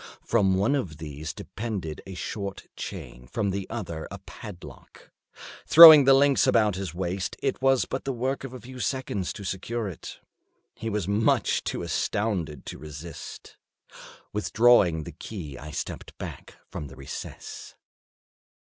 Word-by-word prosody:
From 100 -5 +2
one 100 +9 +2
of 95 - -2
these 75 0 -6
depended 100 -9 -5
a 95 - -7
short 100 +1 -5
chain, 60 0 -8
from 100 - -1
the 95 0 -4
other 85 -9 -5
a - - -7
padlock. - - -12 0.6
Throwing 155 -3 +11
the 135 0 +7
links 140 0 +4
about 110 -3 +4
his 95 -4 -5
waist, 90 +1 -3
it 135 -1 -2
was 135 -1 +3
but 130 - -4
the 135 - -2
work 130 +2 -2
of 135 - -6
a 130 - -8
few 130 +1 -11
seconds 125 -9 -2
to 100 - -9
secure 105 +4 -3
it. 90 - -8 0.6
He 115 - -5
was 105 -4 -1
too 100 - -2
much 105 +2 +2
astounded 90 -9 -2
to - - -7
resist. 75 +1 -9 0.8
Withdrawing 105 -6 +4
the - - -8
key 85 -10 -8
I 70 +3 -9
stepped 75 - -6
back - - -8
from 75 - -6
the 70 - -12
recess. 70 0 -8
100 Hz, 150 wpm, -26 LUFS, 80-120 Hz, 0.8 s, Throwing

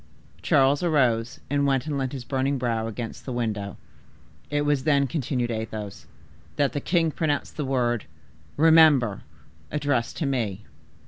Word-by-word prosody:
Charles 135 +1 +3
arose, 125 -9 +1
and 140 0 +1
went 135 -2 +1
and 150 -2 -2
leant 135 -2 -2
his 135 -3 -6
burning 135 +2 -1
brow 115 -3 -1
against 115 +1 -6
the 130 - -6
window. 105 -5 -3 0.7
"It 145 0 0
was 145 -3 +1
then," 140 -3 +3
continued 130 -4 -2
Athos, 110 -2 -5 0.5
"that 140 -4 +1
the 145 - -2
king 165 -1 +1
pronounced 150 -2 -2
the 150 - -3
word 120 -4 0 0.5
'REMEMBER!' 155 -9 +5 0.5
addressed 145 -5 -1
to 155 - -1
me. 110 -7 -2
135 Hz, 145 wpm, -25 LUFS, 115-145 Hz, 0.7 s, REMEMBER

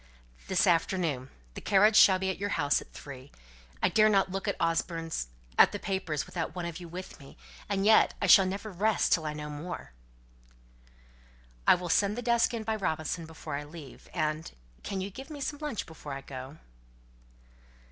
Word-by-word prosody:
"This 190 - +2
afternoon; 165 -6 +1 0.2
the - - -8
carriage 210 +2 +4
shall 190 -3 +8
be 190 0 -1
at 185 - -7
your 200 -3 -1
house 145 -2 +2
at - - -15
three. 135 -1 -10 0.5
I - - +5
dare 215 0 +5
not 195 -2 +2
look 195 +1 -4
at - - -1
Osborne's 165 - -1 0.3
at - - +7
the - - -2
papers 190 -7 -2
without 170 0 -4
one 175 -1 -3
of 170 0 -5
you 175 - -9
with 180 +3 -8
me; 135 - -14 0.3
and 200 -1 0
yet 220 +1 +5
I - - 0
shall 195 -2 +7
never 200 +3 -4
rest 210 +4 +2
till 160 -2 +1
I 150 - -2
know 150 0 -6
more." 160 +5 -7 1.8
"I'll 180 0 +4
send 200 +5 +2
the 245 - -4
desk 235 0 +3
in 230 -2 -4
by 220 0 -1
Robinson 160 -3 -2
before 160 -2 -8
I 145 - -5
leave. 145 -3 -12
And 155 -1 -2 0.3
can 195 -1 -4
you 195 +2 -4
give 270 - -10
me 300 -2 -7
some 290 +1 -3
lunch 295 -8 -3
before 150 -3 -9
I 135 - -5
go?" 135 +2 -9
180 Hz, 190 wpm, -29 LUFS, 155-205 Hz, 1.8 s, shall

